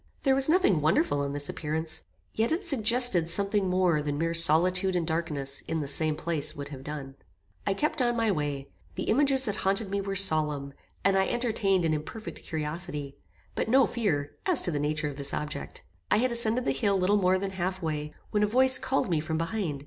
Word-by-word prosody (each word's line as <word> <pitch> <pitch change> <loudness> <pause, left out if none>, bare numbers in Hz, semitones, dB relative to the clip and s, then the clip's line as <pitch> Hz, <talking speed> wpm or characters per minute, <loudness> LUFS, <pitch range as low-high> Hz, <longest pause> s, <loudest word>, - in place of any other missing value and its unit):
There 270 - +3
was 270 +2 +6
nothing 315 - +3
wonderful 150 -2 +1
in 140 0 -3
this 145 0 -3
appearance; 160 +1 -4 0.3
yet 225 +4 0
it 355 +5 -1
suggested 240 - +2
something 200 +2 +1
more 180 -4 +2
than 145 -1 -3
mere 165 +2 -1
solitude 180 +3 +4
and 175 -2 0
darkness 155 -4 -2
in 160 - -2
the 145 - -4
same 155 +2 +3
place 155 -1 -2
would 140 0 -7
have 135 -2 -9
done. 140 -2 -7 0.5
"I - - +1
kept 300 +4 -1
on 240 -1 +1
my 225 -2 +1
way. 145 -5 -3 0.3
The - - -3
images 270 +2 +3
that 210 -3 -2
haunted 195 +1 0
me 200 0 -1
were 195 0 -4
solemn; 150 -7 +3 0.3
and 195 0 +3
I 190 - +1
entertained 210 -7 0
an 160 - +1
imperfect 155 +9 -6
curiosity, 150 -2 -5 0.4
but - - -2
no 265 +3 +5
fear, 160 -12 -2 0.2
as 360 -6 +3
to 175 - -1
the 145 - -2
nature 150 +1 -2
of 140 -2 -7
this 140 -1 +4
object. 145 -1 -6 0.3
I - - +3
had 250 +3 +1
ascended 235 +1 0
the - - +1
hill 195 +9 0
little 190 +3 +2
more 185 -1 +2
than 195 +1 -4
half 185 0 -3
way, 150 -3 -4 0.2
when 210 - +1
a 210 - +3
voice 260 +4 +5
called 270 - -1
me 170 -4 0
from 160 +1 -3
behind. 165 -3 -3
175 Hz, 210 wpm, -27 LUFS, 150-215 Hz, 0.5 s, was